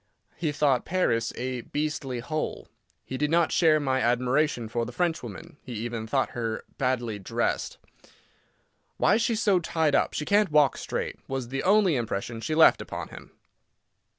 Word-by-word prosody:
He 160 -3 -1
thought 140 -4 +2
Paris 115 -11 0
a 125 0 -3
"beastly 145 -3 -3
hole." 155 +5 -4 0.4
He 130 - -5
did 150 0 +1
not 170 +1 +3
share 160 -3 +4
my 130 -2 0
admiration 125 +1 +1
for 115 +1 -2
the 120 - -5
Frenchwoman; 145 - -3
he 125 - -8
even 115 0 -4
thought 135 +3 0
her 115 -2 -3 0.2
badly 120 -5 -1
dressed. 95 - -2 1.2
"Why 210 - +4
she's 225 -1 0
so 200 -4 +4
tied 160 -3 0
up, - - +2
she 150 - -3
can't 205 +1 +3
walk 150 -3 +4
straight," - - -4
was 135 -3 -4
the 135 +1 -2
only 195 -4 +4
impression 115 -1 -3
she 155 +6 -2
left 160 - +6
upon - - -6
him. - - -12
135 Hz, 160 wpm, -27 LUFS, 120-160 Hz, 1.2 s, left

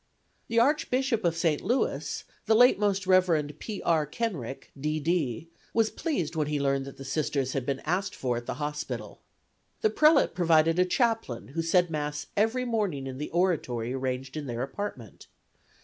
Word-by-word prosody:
The 230 - -2
Archbishop 260 -3 +2
of 165 -1 +1
St. 165 -3 +1
Louis, 245 +6 -1 0.2
the 220 - +5
late 245 -1 +6
Most 200 -2 +1
Rev. 180 -6 +3
P. 215 -3 -6
R. 160 -3 +2
Kenrick, 150 - -4
D. 150 +2 -2
D., 155 -3 -1 0.3
was 225 -1 +3
pleased 180 - -2
when 155 -2 0
he 150 -1 -1
learned 135 -1 +1
that 140 - -10
the 135 - -9
Sisters 135 -2 -1
had 130 -2 -2
been 135 -1 -1
asked 190 +3 -1
for 125 -2 -1
at 120 0 -5
the - - -2
hospital. 150 0 -5 0.6
The 435 - +3
prelate 305 -1 +4
provided 165 -1 +3
a 180 - +5
chaplain, 225 - 0
who 165 +5 -2
said 175 +1 +2
Mass 150 -1 -3
every 225 +5 +1
morning 205 - -1
in 130 0 -6
the 150 - -4
oratory 135 -10 0
arranged 130 +1 -3
in 150 -2 -4
their 120 0 -2
apartment. 135 - -6
160 Hz, 175 wpm, -28 LUFS, 135-205 Hz, 0.6 s, late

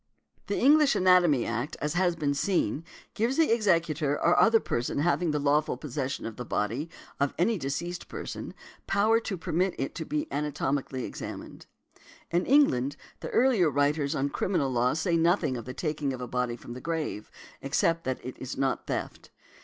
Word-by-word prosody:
The 200 - -1
English 295 +2 +5
Anatomy 180 -8 +4
Act, 120 +5 -3
as 150 +1 -2
has 175 -1 +2
been 145 -3 0
seen, 150 - 0 0.3
gives 235 +5 0
the 325 -5 +4
executor 165 -9 +1
or 170 +4 +2
other 225 0 +6
person 120 - -2
having 175 +3 +1
the 150 - 0
lawful 145 -1 +1
possession 135 -1 -4
of 115 -1 -6
the 125 - -4
body 115 +8 -2 0.3
of 140 0 0
any 205 +4 +2
deceased 165 +6 -4
person - - -6 0.3
power 215 +3 +3
to 205 -4 -4
permit 175 +3 0
it 135 - -3
to - - -4
be 300 +1 -2
anatomically 140 -3 -2
examined. - - -8 0.6
In 175 +2 +1
England, 145 - +3 0.2
the - - -6
earlier 235 -10 +3
writers 145 +1 +1
on 140 0 0
criminal 140 -3 0
law 125 0 +2
say 170 +2 0
nothing 165 -5 +2
of 115 -3 -6
the 130 - -6
taking 150 -4 -2
of 130 - -6
a 125 - -5
body 125 0 -1
from 120 - -10
the 125 - -8
grave, 160 -10 -3 0.3
except 165 +4 +1
that 130 -1 -2
it 130 - -6
is 130 - -6
not 135 0 -1
theft. - - -4
150 Hz, 175 wpm, -28 LUFS, 135-180 Hz, 0.6 s, other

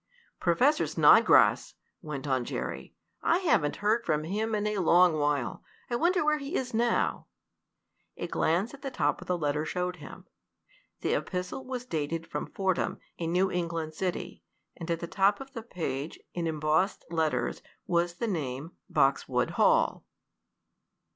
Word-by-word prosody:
"Professor 255 - +3
Snodgrass!" - - +5 0.3
went 150 -4 -6
on 130 -2 +1
Jerry. - - -5 0.3
"I 335 - +3
haven't 310 - +2
heard 225 +3 +3
from 155 -5 0
him 215 +6 -1
in 210 0 -1
a 210 -1 0
long 175 0 +5
while. 145 -6 -1 0.3
I - - +1
wonder 345 +5 +2
where 305 0 +2
he 285 +5 -5
is 250 -2 -2
now?" 235 +1 +1 0.9
A - - -3
glance 180 - 0
at 280 - -12
the 275 - -4
top 150 - 0
of - - -11
the 180 - 0
letter 150 -1 0
showed 180 +2 -2
him. 150 - -11 0.8
The - - 0
epistle 180 +8 -3
was 250 -1 -4
dated 165 -3 -3
from - - -5
Fordham, 190 -2 -1 0.2
a 165 - -2
New 185 +3 +2
England 165 -2 -2
city, 180 +2 -4 0.3
and 170 0 -8
at 165 -1 -1
the - - -2
top 195 +3 +2
of 270 0 -10
the 230 - -5
page, 160 - -4
in 170 -1 -2
embossed 155 +4 0
letters, 160 -2 0 0.2
was 175 0 +1
the 235 - -2
name 150 - -3 0.2
"Boxwood 135 0 +1
Hall." - - +3
175 Hz, 155 wpm, -29 LUFS, 155-220 Hz, 0.9 s, Snodgrass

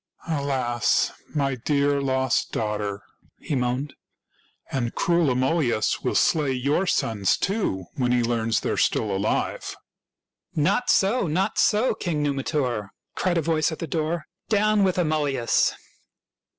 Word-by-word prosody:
" - - -21
Alas, 135 -6 +1 0.2
my 140 -2 +1
dear 140 +3 +1
lost 130 -2 0
daughter!" 105 -2 -2 0.4
he - - -5
moaned. 130 +2 -1 0.8
"And 120 -3 -2
cruel 170 -4 +2
Amulius 130 -3 +1
will - - -1
slay 150 -4 +2
your 140 +9 0
sons, 105 - +1
too, 190 - -1
when 125 -2 0
he 125 -1 +2
learns 115 -1 0
they - - -1
are - - -2
still 105 -3 +1
alive." 100 +3 -1 0.4
'' - - -47
Not 195 +11 +1
so, 200 +1 +3
not 190 +7 0
so, 220 +4 +3
King 155 -5 -2
Numitor! 135 -6 -1
" - - -59
cried 180 -2 0
a 165 - +1
voice 160 0 +1
at 160 - -5
the - - -4
door. 160 +1 -2 0.2
"Down 215 -1 +3
with 185 -1 +1
Amulius!" 150 -7 +1
140 Hz, 145 wpm, -24 LUFS, 120-165 Hz, 0.8 s, so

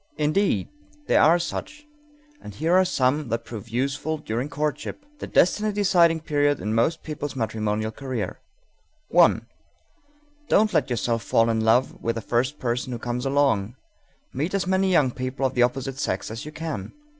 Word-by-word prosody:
Indeed, 155 +7 +1 0.4
there - - +4
are 165 +3 +6
such, 295 - -5 0.6
and 105 - -10
here 160 +7 0
are 185 +1 +6
some 140 -4 0
that 115 0 -2
prove 115 -1 -8
useful 140 +6 -1
during 125 -1 -3
courtship, 150 - -3
the - - -5
destiny 210 +4 +3
deciding 175 -5 +3
period 145 -2 +1
in 105 - -2
most 140 +9 +1
people's 145 -2 -5
matrimonial 110 -2 -1
career: 125 -6 -5 0.7
_1. - - +5 1.0
Don't 210 0 +3
let 140 -5 +2
yourself 115 -1 0
fall 115 +2 +2
in 110 - 0
love 110 +4 +2
with 115 - -1
the 115 - -3
first 125 +7 0
person 125 +1 -2
who 120 - -3
comes 120 +2 -3
along; 130 -6 +1 0.6
meet 155 +9 -2
as 195 - 0
many 190 +1 +2
young 145 -8 +3
people 130 +2 -3
of 130 - 0
the 125 - +1
opposite 135 +2 0
sex 105 -8 -2
as 115 +4 -6
you 150 - -7
can. 155 0 -5
135 Hz, 170 wpm, -24 LUFS, 115-160 Hz, 1.0 s, are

